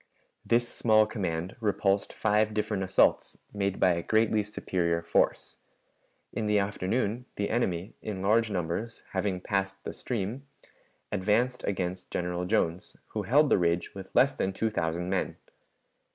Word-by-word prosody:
This 120 +1 +2
small 110 -2 +4
command 90 -5 -3
repulsed 100 -2 +1
five 105 0 +1
different 105 -2 -1
assaults, 95 0 +2 0.2
made 100 -2 -1
by 90 - +5
a 85 0 0
greatly 110 +2 +2
superior 85 -5 -1
force. 85 - +1 0.8
In 110 - -2
the 105 0 +3
afternoon 100 +4 -1
the 100 - -2
enemy, 95 -5 -1
in 100 -3 -5
large 110 +3 +3
numbers, 95 +4 -3
having 95 -1 -1
passed 95 0 -2
the - - -5
stream, 120 +4 -4 0.6
advanced 105 +6 +1
against 90 -2 -3
General 90 0 -2
Jones, 90 -3 -1
who - - -3
held 145 +4 +4
the - - +4
ridge 85 0 0
with 95 -1 -8
less 135 +1 +5
than 95 -7 -1
two 110 +3 -1
thousand 85 -2 -1
men. 95 - -1
100 Hz, 145 wpm, -29 LUFS, 90-110 Hz, 0.8 s, by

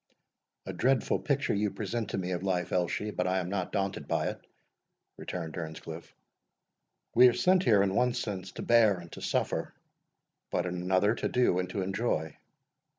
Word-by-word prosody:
"A - - -5
dreadful 130 -1 +2
picture 140 -1 0
you 105 +1 +1
present 110 +2 -3
to - - -2
me 90 -1 -2
of 90 -1 -2
life, 90 -2 -1
Elshie; 90 +4 0
but 90 - 0
I 95 +1 +1
am 90 -1 -2
not 95 -2 -2
daunted 100 0 -2
by - - 0
it," - - -7 0.8
returned 85 -3 -5
Earnscliff. 80 -1 -7 1.0
"We 125 +2 +8
are 125 - +4
sent 185 +6 +3
here, 105 -3 +5
in 95 -1 0
one 125 +3 +2
sense, 95 -6 -4
to - - -6
bear 110 -5 +5
and 85 -1 -11
to - - -9
suffer; - - -1 0.7
but, - - -1
in 90 - -2
another, 95 +4 +2
to - - -2
do 125 -8 +2
and 90 - -2
to 100 -4 -2
enjoy. 95 -6 -1
95 Hz, 180 wpm, -30 LUFS, 90-115 Hz, 1.0 s, We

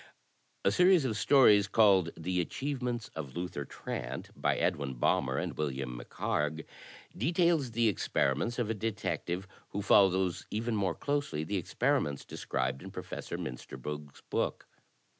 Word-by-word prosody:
A - - +5
series 180 -4 +5
of 115 -4 0
stories 105 -3 +6
called 95 -4 +5
"The 90 +2 0
Achievements 125 - -3
of 70 -5 -6
Luther 85 -5 -4
Trant," 65 0 -6
by - - +1
Edwin 70 -3 0
Balmer - - +1
and - - -2
William 65 -4 -3
MacHarg, 75 +5 -2 0.5
details 165 - +2
the 115 0 +3
experiments 95 - 0
of 115 -3 0
a - - +1
detective 100 -4 -3 0.2
who 100 - -3
follows 95 -3 +4
even 115 +2 -1
more 100 -3 0
closely 145 - -1
the 100 +6 -2
experiments 95 - 0
described 65 +1 -2
in - - -8
Professor - - -6
Miinsterberg's 70 +3 -7
book. - - -1
95 Hz, 135 wpm, -31 LUFS, 75-120 Hz, 0.5 s, stories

